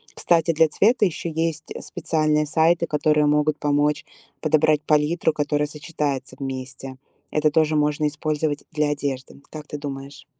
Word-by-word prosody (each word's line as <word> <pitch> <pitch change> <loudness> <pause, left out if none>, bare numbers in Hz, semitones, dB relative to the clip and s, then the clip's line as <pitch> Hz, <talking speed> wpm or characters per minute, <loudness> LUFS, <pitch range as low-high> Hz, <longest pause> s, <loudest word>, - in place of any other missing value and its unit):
Кстати, 165 -1 +2
для 160 0 +4
цвета 220 - +3
еще 170 -1 -3
есть, 165 -1 -2
э, - - -7
специальные 155 -3 0
сайты, 165 +3 +2
которые 150 0 +2
могут 150 0 +2
помочь 145 0 +1 0.4
подобрать 155 -1 +3
палитру, 155 +2 +2
которая 150 0 0
сочетается 145 -4 -4
вместе. 130 0 -6 0.3
Это 150 0 +2
тоже 155 0 +2
можно 150 0 +1
использовать 150 0 -2
для 150 -1 0
одежды. 140 -2 -4
Как 155 -1 -9
ты 150 - -6
думаешь? 140 -1 -8
150 Hz, 145 wpm, -23 LUFS, 145-155 Hz, 0.4 s, для